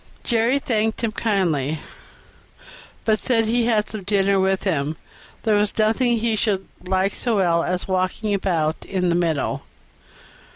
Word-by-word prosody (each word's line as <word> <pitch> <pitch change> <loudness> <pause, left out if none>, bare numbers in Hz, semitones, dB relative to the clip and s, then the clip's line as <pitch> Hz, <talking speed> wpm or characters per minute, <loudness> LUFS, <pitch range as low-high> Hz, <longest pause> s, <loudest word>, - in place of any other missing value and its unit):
Jerry 235 +2 +2
thanked 225 -4 -1
him 225 - +1
kindly, 170 - 0 1.3
but 215 -1 +1
said 240 -3 +3
as 225 - -2
he 235 +1 +2
had 215 -3 +2
some 215 - -5
dinner 195 0 +2
with 190 0 +1
him 155 -5 -1 0.5
there 220 - +2
was 205 0 +1
nothing 230 +3 +2
he 225 0 0
should 205 -3 -1 0.2
like 190 +1 +1
so 235 -3 -1
well 170 -4 +2
as 180 0 -2
walking 185 +3 -1
about 165 -5 0
in 180 -2 -1
the 170 - +2
meadow. 165 -5 0
200 Hz, 155 wpm, -22 LUFS, 180-220 Hz, 1.3 s, said